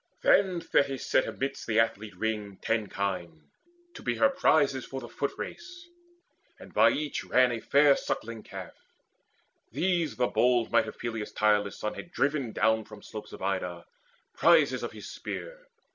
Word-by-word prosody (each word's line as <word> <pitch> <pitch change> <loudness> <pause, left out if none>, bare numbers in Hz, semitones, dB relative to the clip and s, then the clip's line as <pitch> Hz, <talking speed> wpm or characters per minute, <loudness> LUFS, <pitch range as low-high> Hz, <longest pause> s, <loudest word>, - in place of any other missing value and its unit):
Then 185 -3 +4
Thetis 135 -4 +1
set - - +2
Amidst 135 +1 -4
the 110 -1 +2
athlete 110 -3 0
ring 105 -2 -3
ten 110 -3 0
kine, 85 -7 -4 0.4
to - - -10
be - - -1
Her 280 - +4
prizes 145 - +2
for 135 - -6
the 120 - -8
footrace, 340 - -5 0.7
and - - -14
by - - +6
each 150 0 -2
Ran 125 -1 +3
a 115 - -2
fair 140 +3 +5
suckling 115 -1 -4
calf. 95 -4 -9 1.0
These 175 -3 0
the 125 - +2
bold 120 -1 +2
might 115 -1 +3
Of 110 - -8
Peleus' 115 -3 -4
tireless 105 -1 +2
son 105 - -3
had 175 - -9
driven 140 -6 0
down 110 0 +2
From 110 0 -13
slopes 105 -1 -9
of - - -9
Ida, 90 -3 -2 0.5
prizes - - +4
of - - -4
his - - -10
spear. - - -7
115 Hz, 160 wpm, -28 LUFS, 105-140 Hz, 1.0 s, by